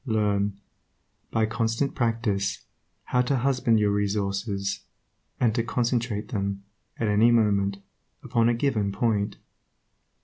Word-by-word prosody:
Learn, 100 -3 +1 0.7
by 110 -1 +1
constant 115 +4 -1
practice, 115 -4 -1 0.4
how 125 - +1
to 130 +2 +1
husband 125 -3 +2
your 105 -1 +2
resources, 100 0 -1 0.6
and 115 -3 +3
to 115 - +1
concentrate 120 -2 -1
them, 100 -2 -2 0.3
at 115 - -1
any 105 +3 +5
moment, 100 -4 +2 0.5
upon 120 -3 +2
a 120 - +2
given 115 -6 0
point. 105 -2 0
110 Hz, 115 wpm, -26 LUFS, 100-120 Hz, 0.7 s, any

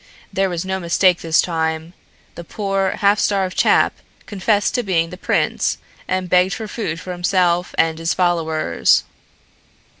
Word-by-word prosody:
There 195 0 +1
was 175 0 -3
no 190 0 -2
mistake 180 +1 +2
this 160 -1 +2
time. 160 0 -2 0.4
The 170 - -9
poor, 195 +1 -1
half 205 +1 +4
starved 190 -2 0
chap - - +3 0.3
confessed 205 +1 0
to 250 - +1
being 170 -6 0
the - - -7
prince 185 - 0 0.3
and 185 0 -1
begged 180 +2 +3
for 220 - -6
food 205 -7 -4
for 185 - -7
himself 180 -1 0
and 160 0 +1
his 165 0 -1
followers." 160 - +1
180 Hz, 150 wpm, -19 LUFS, 165-195 Hz, 0.4 s, half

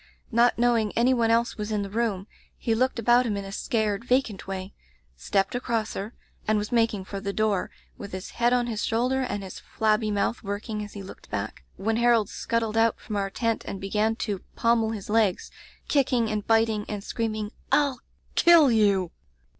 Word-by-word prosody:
Not 235 +1 +4
knowing 235 -3 +2
any 245 +3 +4
one 230 -2 +2
else 230 +1 +2
was 210 0 -4
in 210 -1 0
the 200 - -6
room, 215 -4 -1 0.3
he 230 - 0
looked 255 +3 +1
about 240 +2 +4
him 205 -2 -1
in 200 - -5
a 195 - -7
scared, 215 -1 -1
vacant 245 -6 0
way, 190 0 -5 0.4
stepped 195 - 0
across 235 -3 -1
her, 205 +4 -6 0.3
and 215 0 +3
was 210 0 -3
making 225 -5 +1
for 200 +1 -5
the 200 0 -3
door, 210 -2 0 0.3
with 200 - -7
his 185 +1 -6
head 240 0 +1
on 245 -1 +2
his 225 -3 -3
shoulder 250 +4 +1
and 205 -6 -3
his 190 - -8
flabby 215 0 0
mouth 205 +3 0
working 210 +1 -4
as 205 - -9
he 200 - -7
looked 190 - -12
back, - - -5
when 220 +3 0
Harold 235 -3 +3
scuttled 225 -1 -2
out 225 0 +3
from 215 - -6
our 200 -1 -1
tent 230 +2 -1
and 195 - -5
began 210 +3 0
to 205 -4 -3
pommel 230 -1 +2
his 215 -3 -5
legs, 210 -3 +1 0.4
kicking 250 -5 +2
and 210 -1 -3
bit 225 0 +4
ing, 210 -1 -2
and 205 -2 -4
screaming, 215 -2 -3 0.2
TU 285 -3 +3 0.4
kill 335 -6 +7
you! 200 -5 +3
220 Hz, 195 wpm, -26 LUFS, 205-235 Hz, 0.4 s, kill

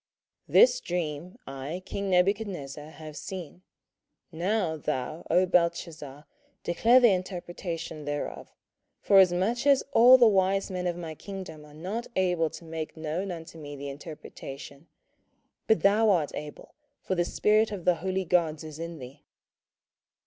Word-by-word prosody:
27:004:018 - - -14
This - - +7
dream 170 - -4
I 135 +7 -6
king 200 0 -4
Nebuchadnezzar 180 -6 0
have 155 -1 -10
seen. 180 0 -7 0.7
Now 180 0 0
thou, 150 +1 -4
O 180 +3 +4
Belteshazzar, 170 -5 -1 0.4
declare 230 +9 +4
the 240 -4 +6
interpretation 175 -4 -4
thereof, 145 0 -5 0.5
forasmuch 195 +6 +3
as 280 -2 +5
all 250 +3 +8
the 245 - +6
wise 195 -1 +2
men 180 -1 -2
of 175 -1 -2
my 165 -2 -6
kingdom 185 -3 -8
are 150 - -16
not 195 +9 -4
able 180 -4 +1
to 170 - -11
make 160 0 -6
known 160 +5 -3
unto 165 -2 -8
me 145 -1 -8
the 140 0 -6
interpretation: 140 0 -10 0.8
but 220 - +3
thou 210 +3 +4
art 170 -7 +2
able; 150 0 -8 0.3
for - - -1
the 175 -1 +1
spirit 215 +5 +2
of 195 -5 -6
the 180 -2 +3
holy 190 +1 -1
gods 160 -3 +1
is 155 -1 -9
in 165 0 -6
thee. 135 +1 -11
175 Hz, 145 wpm, -28 LUFS, 155-195 Hz, 0.8 s, all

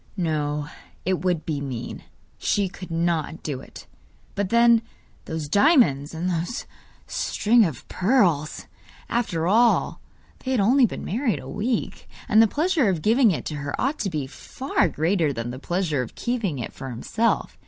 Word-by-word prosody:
No, 150 -4 -1 0.4
it 185 0 0
would 175 -4 0
be 150 -3 -2
mean; 125 -4 -5 0.4
she 200 -2 +1
could 185 0 -10
not 165 -1 -1
do 140 -4 -4
it! - - -12 0.5
But 200 -2 -2
then, 235 0 +5 0.4
those 160 -2 -4
diamonds, 165 - +3
and 170 +3 -2
those 175 +5 -2 0.4
string 230 +2 +2
of 155 -9 -5
pearls! 180 - +1 0.4
After 205 -9 -1
all, 230 +5 +3 0.4
they 260 - -6
had 260 -3 +2
only 245 +5 +5
been - - -7
married 230 +3 0
a - - -10
week, 235 +2 -3 0.2
and 215 +1 +6
the 225 - +6
pleasure 310 - +1
of 170 -5 -1
giving 230 +2 +5
it 180 - -2
to 150 - -4
her 145 0 -4
ought 280 +4 0
to 200 - -1
be 150 -5 -3
far 185 - -1
greater 160 0 +1
than 120 -2 -4
the 130 - -7
pleasure 175 -3 -1
of 120 - -7
keeping 230 - -2
it 120 - -5
for 135 - -7
himself. 220 - -1
180 Hz, 165 wpm, -24 LUFS, 150-230 Hz, 0.5 s, and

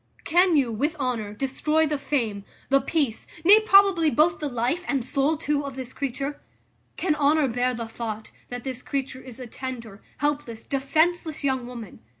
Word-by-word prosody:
Can 350 0 +4
you, 260 -5 +2
with 290 +9 -1
honour, 250 -7 -2
destroy 275 +7 0
the 300 -2 -1
fame, 225 -9 -1 0.3
the 275 0 +4
peace, 275 -5 -1 0.2
nay, 410 +4 +9
probably, 395 -6 +5
both 315 +4 +3
the 295 - -2
life 245 +8 -1
and 270 -4 0
soul 280 +4 +1
too, 295 -1 -1
of 275 -2 -6
this 260 -1 -6
creature? 275 +1 -4 0.6
Can 350 -4 +1
honour 300 0 +3
bear 250 +1 0
the 230 -1 -5
thought, 220 -1 -6 0.2
that 245 0 -6
this 255 -2 -5
creature 270 -1 -4
is 255 -2 -11
a 255 - -6
tender, 235 -4 -7 0.2
helpless, 290 -6 -2
defenceless, 315 +4 0
young 260 -3 0
woman? 235 -5 -9
275 Hz, 170 wpm, -25 LUFS, 245-305 Hz, 0.6 s, nay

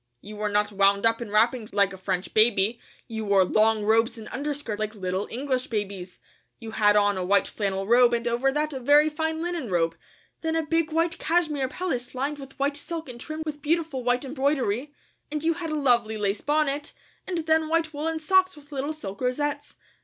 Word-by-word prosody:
You 210 +8 -10
were 210 0 -1
not 205 0 +1
wound 200 +1 +3
up 230 +1 +2
in 235 - -5
wrappings 220 +2 +1
like 200 -1 +3
a - - -6
French 185 -1 -3
baby; 215 0 +3 0.3
you 220 -2 -4
wore 200 -2 +4
long 215 +2 +3
robes 225 +2 +2
and 220 -1 -9
underskirts 280 -5 -4
like 215 +1 -3
little 185 0 -2
English 260 +1 -2
babies. 200 -4 -4 0.4
You 225 -2 -8
had 210 -2 +3
on 205 -1 +3
a 185 - -2
white 200 +2 +3
flannel 195 -2 -2
robe 240 +3 +5
and 235 0 -2
over 240 +3 +1
that 300 +2 -1
a 265 - -4
very 290 +4 +5
fine 320 +1 -2
linen 345 -8 -3
robe, 165 -2 +1 0.5
then 320 0 -1
a 325 -1 0
big 330 0 0
white 330 +2 0
cashmere 310 -5 +1
pelisse 260 -10 -4
lined 285 +3 -2
with 270 -1 -11
white 280 +1 0
silk 320 0 -6
and 240 -1 -9
trimmed 310 +2 -5
with 295 -1 -5
beautiful 310 -3 -1
white 245 +2 +1
embroidery, 270 -2 -1 0.4
and 300 0 -3
you 330 +1 +3
had 330 0 -5
a 310 - -2
lovely 240 -6 +2
lace 205 0 -1
bonnet, 295 0 0 0.3
and 365 - -2
then 315 0 +2
white 325 -1 +1
woolen 320 +2 -2
socks 370 +3 +3
with 295 0 -17
little 285 +2 -2
silk 200 -10 -8
rosettes. 285 +3 -2
255 Hz, 205 wpm, -26 LUFS, 215-305 Hz, 0.5 s, robe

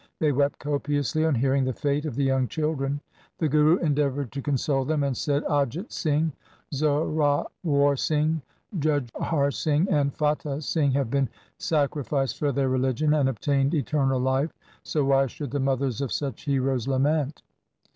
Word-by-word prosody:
They 155 -2 +2
wept 140 +1 +1
copiously 145 0 -1
on 160 -3 +2
hearing 135 +2 +2
the 130 0 -1
fate 145 +4 -1
of 135 - -5
the 140 - 0
young 135 -1 +2
children. 145 -2 -2 0.4
The 160 - +1
Guru 150 +3 +4
endeavoured 145 - 0
to 140 - -4
console 135 -1 0
them, 150 +1 0
and 140 -2 0
said, 145 +3 0
' - - -12
Ajit 145 - -1
Singh, 155 0 0 0.4
Zorawar 145 0 +1
Singh, 155 +1 +1 0.4
Jujhar 145 0 0
Singh, 155 +5 +1
and 140 -2 +2
Fatah 150 -1 -1
Singh 145 -3 +1
have 135 -4 0
been 140 -2 +1 0.3
sacrificed 140 -3 0
for 145 -1 +1
their 135 0 0
religion 130 +3 +1
and 145 -3 +3
obtained 135 - +1
eternal 135 -2 +1
life, 130 +4 +1 0.3
so 150 -3 -1
why 135 0 +3
should 140 +1 -7
the 145 - -1
mothers 135 -1 0
of 135 - -2
such 135 -6 -3
heroes 135 -3 0
lament 140 +2 0
140 Hz, 160 wpm, -26 LUFS, 135-150 Hz, 0.4 s, Guru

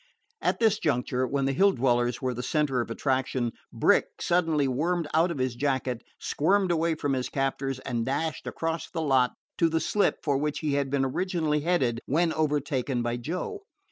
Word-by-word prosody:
At - - +1
this 220 -2 +3
juncture, 130 -2 0
when 135 +2 0
the 135 - +2
Hill 195 +7 +4
dwellers 120 0 +1
were 130 -1 0
the 125 - -4
center 140 -2 +1
of 115 - -5
attraction, 130 -1 -1 0.2
Brick - - +3
suddenly 160 -5 +2
wormed 165 +5 0
out 165 +3 +4
of 170 - -3
his 130 -1 0
jacket, 130 -3 -1 0.2
squirmed 190 +4 +1
away 165 -1 +1
from 145 -3 -1
his 130 -1 -1
captors, 135 -1 -1
and 120 -3 -2
dashed 145 +6 -2
across 165 0 -3
the 170 - -4
lot 130 -4 +3 0.3
to 165 - +4
the 160 0 +1
slip 205 +4 +1
for 140 -3 +1
which 150 0 -1
he 150 -3 0
had 140 -1 0
been 135 -1 +1
originally 160 +1 0
headed 145 -8 +1
when 165 +4 +2
overtaken 140 -5 0
by 120 0 -1
Joe. 180 - -4
140 Hz, 185 wpm, -27 LUFS, 130-165 Hz, 0.3 s, Hill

